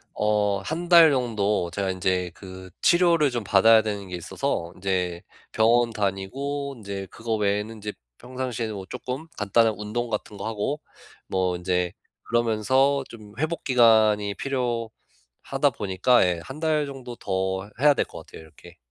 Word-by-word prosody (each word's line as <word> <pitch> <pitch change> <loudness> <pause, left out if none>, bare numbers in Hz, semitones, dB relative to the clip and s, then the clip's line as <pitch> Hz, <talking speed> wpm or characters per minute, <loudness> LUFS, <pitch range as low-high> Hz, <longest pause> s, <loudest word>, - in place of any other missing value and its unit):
어 105 -1 +1
1 170 - -4
달 170 -2 +8
정도 105 -8 0
제가 95 +2 -2
인제 90 -1 -1
그 95 -1 -11
치료를 170 -4 +4
좀 120 -3 -3
받아야 110 +3 +6
되는 100 -2 -4
게 90 - -5
있어서 85 0 -3
인제 90 -2 -2 0.3
병원 115 +2 +3
다니고 130 +8 -3
인제 100 -2 -6
그거 115 0 -3
외에는 105 +2 -1
인제 105 -1 -6 0.3
평상시에는 125 -4 -4
뭐 95 -2 -7
쪼끔 130 +5 -5
간단한 110 +2 +3
운동 110 +3 -3
같은 105 -1 -4
거 100 - -6
하고 115 +7 -2 0.5
뭐 90 -1 0
인제 90 0 -1 0.3
그러면서 120 +5 +2
좀 105 -3 -12
회복 160 +3 -2
기간이 110 -5 +4
필요하다 120 - -3
보니까 100 +5 +3
예 90 -2 -1
1 135 +4 -9
달 155 -2 +1
정도 130 -3 -8
더 95 0 -2
해야 145 0 +6
될 - - +1
것 - - -11
같아요. - - -12
이렇게. 85 +2 -16
110 Hz, 290 characters per minute, -25 LUFS, 95-130 Hz, 0.5 s, 달